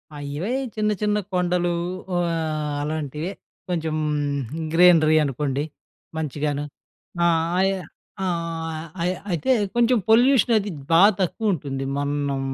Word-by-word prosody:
ఆ! - - -7 0.2
ఇవే 190 +10 -2 0.2
చిన్న 215 0 +1
చిన్న 210 0 +2 0.2
కొండలు 180 -1 +1 0.5
ఆహ్, 160 -3 -1
అలాంటివే. 155 +3 -3 0.4
కొంచెం 160 -3 -1 0.8
గ్రీనరీ 165 -3 +6
అనుకోండి! 140 0 -1 0.5
మంచిగాను. 145 -1 -2 0.6
ఆహ్, 165 -1 +2
అయ్ 195 +1 +3 0.5
ఆహ్, 165 -2 -3 0.2
అయి 180 +2 +1 0.2
అయితే 175 - 0 0.2
కొంచెం 240 +1 +4
పొల్యూషన్ 240 0 +5
అనేది 205 -1 0 0.2
బాగా 200 +6 +7
తక్కువ 205 +3 0
ఉంటుంది. 135 -3 -4
మనం 145 -1 -1
165 Hz, 110 wpm, -23 LUFS, 150-190 Hz, 0.8 s, బాగా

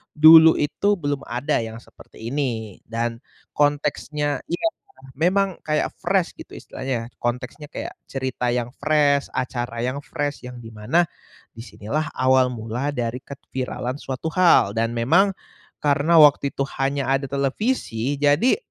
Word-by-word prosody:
dulu 160 +1 +9
itu 200 +8 +1
belum 145 -3 -2
ada 120 +3 -1
yang 110 0 -7
seperti 115 -1 -11
ini 115 -8 -3
dan 115 +1 -3 0.3
konteksnya 145 0 0
iya, 175 +6 0 0.5
memang 190 +2 +1
kayak 150 0 0
fresh, - - +1
gitu, - - -11
istilahnya. 125 -3 -5
Konteksnya 125 +5 -4
kayak 340 - -6
cerita 130 -2 -3
yang 120 -1 -1
fresh, 145 -2 +2
acara 120 -2 -3
yang 130 +3 -2
fresh, 145 -2 -4
yang 125 0 -9
di 115 - -9
mana, 110 +12 +1 0.5
di - - -14
sinilah 135 +8 -3
awal 130 0 +4
mula 115 +4 -3
dari 120 0 -2
keviralan 130 -2 -5
suatu 135 +4 -4
hal, 175 - +5
dan 115 +1 +1
memang 170 +12 +3 0.5
karena 145 +3 +3
waktu 145 -1 +5
itu 135 - 0 0.2
hanya 135 0 0
ada 135 0 0
televisi. 140 - -1
Jadi 145 - +3
140 Hz, 140 wpm, -22 LUFS, 120-150 Hz, 0.5 s, dulu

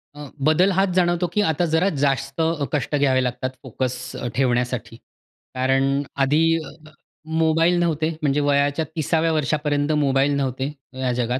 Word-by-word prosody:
अ, 145 -1 -9 0.2
बदल 180 +5 +4
हाच 195 0 +3
जाणवतो 175 -1 +2
की 210 - +2
आता 165 +3 0
जरा 170 +5 +3
जास्त 135 +1 0
अ, 160 -3 0
कष्ट 150 0 -1
घ्यावे 135 -2 +2
लागतात 125 +1 -3
फोकस 130 0 -3 0.2
अ, - - -4
ठेवण्यासाठी. 125 -3 -1 0.6
कारण 135 +1 +2 0.4
आधी 145 +4 +2 0.2
अ-अ 155 +1 -14 0.5
मोबाईल 165 +2 +3
नव्हते. 160 -2 0
म्हणजे 145 -1 +1
वयाच्या 145 +2 +1
30व्या 160 +1 +1
वर्षापर्यंत 150 0 0
मोबाईल 135 +1 +2
नव्हते 135 0 -2 0.3
या 130 -1 0
जगात. 125 +1 -1
145 Hz, 145 wpm, -22 LUFS, 130-160 Hz, 0.6 s, बदल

